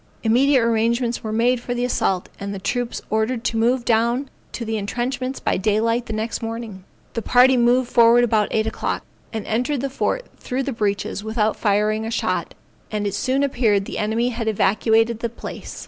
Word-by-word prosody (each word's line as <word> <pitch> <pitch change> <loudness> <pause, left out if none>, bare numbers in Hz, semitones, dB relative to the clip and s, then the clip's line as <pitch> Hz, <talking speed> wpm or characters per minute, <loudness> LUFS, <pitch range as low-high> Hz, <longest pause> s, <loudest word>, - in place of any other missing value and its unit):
Immediate 255 +3 +4
arrangements 235 +1 +1
were 215 - -3
made 240 +3 +2
for 245 +1 -4
the 245 0 0
assault, 190 -6 0
and 200 0 -4
the 200 - -4
troops 245 +5 -2
ordered 225 +2 0
to - - -1
move 240 +2 +2
down 235 +4 +1 0.2
to 235 - -5
the 225 0 -2
entrenchments 250 +5 -3
by - - 0
daylight 220 +4 +1
the 220 - -4
next 220 +2 -3
morning. 225 -4 -6 0.3
The 230 - -2
party 250 +3 +5
moved 245 +1 +3
forward 235 0 +6
about 215 -3 +2
8 220 0 0
o'clock, - - -2 0.3
and 220 -2 -4
entered 250 +6 0
the 275 0 -3
fort - - -1
through 260 +2 -3
the 275 0 -3
breaches 205 -2 -2
without 220 0 0
firing 210 +1 +1
a 225 - -3
shot, 230 - -2 0.3
and 210 -1 -2
it 200 - -1
soon 265 +6 0
appeared 225 -7 +1
the - - -5
enemy 225 +3 0
had 230 -2 -4
evacuated 220 +2 +2
the 235 - -2
place. 235 - -8
230 Hz, 190 wpm, -22 LUFS, 220-245 Hz, 0.3 s, forward